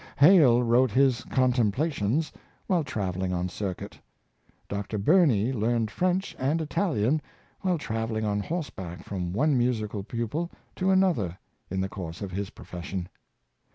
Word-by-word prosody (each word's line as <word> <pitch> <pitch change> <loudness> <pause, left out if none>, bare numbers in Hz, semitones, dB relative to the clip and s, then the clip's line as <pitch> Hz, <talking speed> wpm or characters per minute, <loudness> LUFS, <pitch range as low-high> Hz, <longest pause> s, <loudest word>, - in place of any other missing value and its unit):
Hale 140 -7 +7
wrote 120 +2 +4
his 130 +1 +3
*' - - -14
Contemplations 130 +3 +1 0.2
" - - -36
while 180 -4 +2
traveling 95 -8 -2
on 90 +1 -1
circuit. 95 -1 -5 0.7
Dr. 100 +2 -3
Burney 130 - +4
learned 115 -1 0
French 185 +2 0
and 140 +5 +1
Italian 155 - +1 0.4
while 185 -3 +1
traveling 110 -4 -2
on 105 -1 0
horseback 95 - -5
from 90 -3 -4
one 140 - +2
musical 110 -4 0
pupil 120 - -3 0.3
to 185 0 +1
another 175 - +2 0.3
in 95 +1 -1
the 95 - 0
course 95 -1 -7
of 95 - -5
his 100 +1 -3
profession. 90 0 -6
115 Hz, 140 wpm, -27 LUFS, 100-150 Hz, 0.7 s, Hale